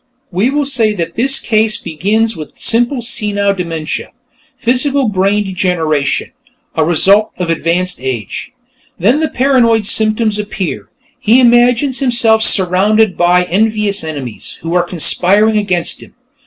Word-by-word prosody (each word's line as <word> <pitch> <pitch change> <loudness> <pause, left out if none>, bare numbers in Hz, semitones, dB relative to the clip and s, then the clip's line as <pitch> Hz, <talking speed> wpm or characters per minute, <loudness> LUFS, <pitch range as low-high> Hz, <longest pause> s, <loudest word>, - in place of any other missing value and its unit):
We 195 +7 0
will 290 +1 -1
say 230 -6 +1
that 170 -4 -4
this 270 +4 +2
case 220 -1 0
begins 210 +6 -1
with 155 -3 -10
simple 240 +2 0
senile 205 -4 -1
dementia 165 -4 -5 0.5
physical 260 +2 +1
brain 200 +1 0
degeneration, 175 -7 -2 0.4
a 160 - 0
result 195 +6 +3
of 175 -2 -2
advanced 175 +2 -1
age. 130 - -5 0.5
Then 225 - +2
the 315 - -1
paranoid 240 -5 +2
symptoms 215 0 +1
appear; 205 -4 -5 0.3
he 230 +4 +3
imagines 245 +2 +3
himself 235 -4 +2
surrounded 200 +1 +3
by 175 +1 +2
envious 210 +1 0
enemies, 140 -7 -7
who 165 +1 -4
are 180 - +3
conspiring 190 +5 +2
against 185 -5 -2
him. - - -16
210 Hz, 130 wpm, -13 LUFS, 180-230 Hz, 0.5 s, result